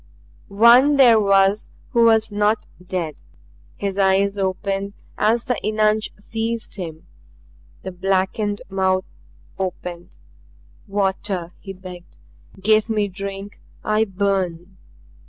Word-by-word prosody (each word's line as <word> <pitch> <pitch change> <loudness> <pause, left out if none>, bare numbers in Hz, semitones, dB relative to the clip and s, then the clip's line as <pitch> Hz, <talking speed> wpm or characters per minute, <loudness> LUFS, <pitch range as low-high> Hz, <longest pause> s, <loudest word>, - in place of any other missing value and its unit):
One 235 +8 +6
there 240 -5 +7
was 195 0 +3 0.2
who 235 -3 +4
was 220 -1 +4
not 210 +1 +1 0.2
dead. 175 -5 -4 0.5
His 200 0 -3
eyes 195 +1 +2
opened 195 +1 -2 0.2
as 225 +3 +2
the 250 - -1
eunuch 215 0 +1
seized 225 +2 -4
him, 160 -4 -7 0.8
the 190 - -5
blackened 195 +3 -1
mouth 190 -1 0 0.5
opened. 180 -2 -5 0.7
"Water!" 195 -3 -2
he 195 - -8
begged. 180 -2 -12 0.4
"Give 215 +3 +3
me 210 -2 0
drink. 195 +1 -7 0.2
I 215 +1 +2
burn!" 190 -2 -2
200 Hz, 105 wpm, -21 LUFS, 190-215 Hz, 0.8 s, there